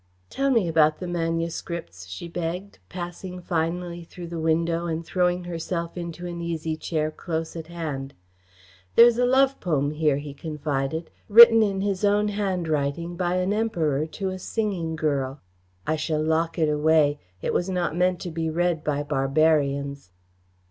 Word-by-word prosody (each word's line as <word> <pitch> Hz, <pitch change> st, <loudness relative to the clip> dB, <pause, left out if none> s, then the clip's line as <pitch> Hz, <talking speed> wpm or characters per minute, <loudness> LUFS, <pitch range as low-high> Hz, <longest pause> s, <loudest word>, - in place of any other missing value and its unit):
"Tell 275 Hz, 0 st, 0 dB
me 230 Hz, -9 st, +3 dB
about 155 Hz, -1 st, +3 dB
the 185 Hz, -, -6 dB
manuscripts," 165 Hz, -, -3 dB
she 90 Hz, -, -7 dB
begged, 175 Hz, +3 st, -5 dB
passing 180 Hz, +1 st, -6 dB
finally 175 Hz, 0 st, -2 dB
through 170 Hz, +1 st, -9 dB
the 170 Hz, -1 st, -4 dB
window 165 Hz, +1 st, +1 dB
and 165 Hz, 0 st, -3 dB
throwing 180 Hz, 0 st, +1 dB
herself 170 Hz, 0 st, -4 dB
into 175 Hz, 0 st, -6 dB
an 170 Hz, -1 st, -5 dB
easy 165 Hz, -2 st, -2 dB
chair 155 Hz, -1 st, -2 dB
close 160 Hz, +1 st, -4 dB
at 160 Hz, -1 st, -6 dB
hand. 150 Hz, -5 st, -5 dB, 0.8 s
"There 235 Hz, -, +10 dB
is 240 Hz, 0 st, +3 dB
a 245 Hz, -, +3 dB
love 270 Hz, +1 st, +3 dB
poem 145 Hz, -5 st, 0 dB
here," 150 Hz, -2 st, +1 dB
he 145 Hz, 0 st, -6 dB
confided, 150 Hz, +1 st, -3 dB, 0.2 s
"written 225 Hz, +1 st, +10 dB
in 195 Hz, -3 st, +1 dB
his 200 Hz, -1 st, -1 dB
own 205 Hz, +1 st, +3 dB
handwriting 170 Hz, -5 st, -1 dB
by 175 Hz, 0 st, 0 dB
an 185 Hz, +2 st, +1 dB
emperor 160 Hz, -10 st, 0 dB
to 190 Hz, +4 st, -4 dB
a 185 Hz, 0 st, -5 dB
singing 185 Hz, -6 st, -2 dB
girl. 140 Hz, -3 st, -1 dB, 0.5 s
I 155 Hz, -, 0 dB
shall 155 Hz, 0 st, -1 dB
lock 160 Hz, +2 st, 0 dB
it 160 Hz, -2 st, +2 dB
away. 150 Hz, -1 st, +3 dB, 0.2 s
It -, -, -1 dB
was 180 Hz, -, 0 dB
not 175 Hz, -4 st, -1 dB
meant 180 Hz, 0 st, +2 dB
to 175 Hz, -, -5 dB
be 160 Hz, 0 st, -2 dB
read 170 Hz, -1 st, 0 dB
by 145 Hz, -1 st, -1 dB
barbarians. 140 Hz, -, +1 dB
165 Hz, 160 wpm, -25 LUFS, 155-180 Hz, 0.8 s, There